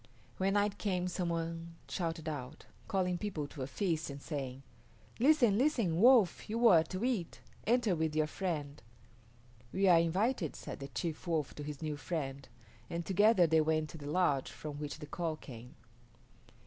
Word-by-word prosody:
When 195 +1 +2
night 205 0 +1
came 180 -3 0
some 180 -1 -2
one 165 0 -3
shouted 165 -3 -3
out, 145 -1 -6 0.2
calling 180 -2 0
people 180 -9 -3
to 140 - -8
a 130 - -2
feast 160 -2 -1
and 140 0 -6
saying, 135 -3 -5 0.6
"Listen, 245 -6 +5
listen, 230 - +2
Wolf, 230 -6 +5
you 230 +2 +3
are 165 -5 +7
to 185 +5 -5
eat; 225 -10 -2 0.3
enter 235 -5 +3
with 160 -1 -1
your 155 0 +3
friend." 150 -5 -4 0.9
"We 195 +1 +2
are 175 -2 +7
invited," 180 - 0
said - - -7
the 135 - -6
chief 165 +3 -4
Wolf 160 -4 0
to - - -8
his 150 +1 -6
new 150 -1 -2
friend, 140 -4 -4 0.4
and 170 0 -3
together 200 0 +5
they 160 -1 +4
went 155 0 0
to 160 - -10
the 145 0 -6
lodge 150 -5 +1
from 150 -2 -7
which 150 0 -5
the 150 - -8
call 160 +1 -3
came. 125 -5 -11
165 Hz, 175 wpm, -33 LUFS, 150-195 Hz, 0.9 s, are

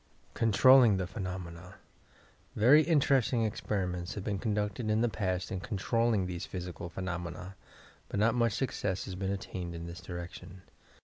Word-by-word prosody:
CONTROLLING 115 0 +6
THE 95 - -1
PHENOMENA 90 -2 -7 0.8
Very 130 +8 +7
interesting 135 -7 +2
experiments 90 -5 -2
have 100 - -5
been 100 -1 -2
conducted 105 +1 -1
in 110 +1 +2
the 120 - +3
past 95 -1 -2
in 95 - -2
controlling 105 +2 0
these 90 -2 -5
physical 90 -1 -6
phenomena, 90 +1 -5 0.5
but 100 - -2
not 115 +2 +4
much 115 -2 +2
success 105 -6 -2
has 95 - -6
yet 90 - -7
been 95 0 -1
attained 90 -3 -5
in 85 0 -6
this 85 +1 -8
direction. 90 0 -8
95 Hz, 150 wpm, -31 LUFS, 90-110 Hz, 0.8 s, Very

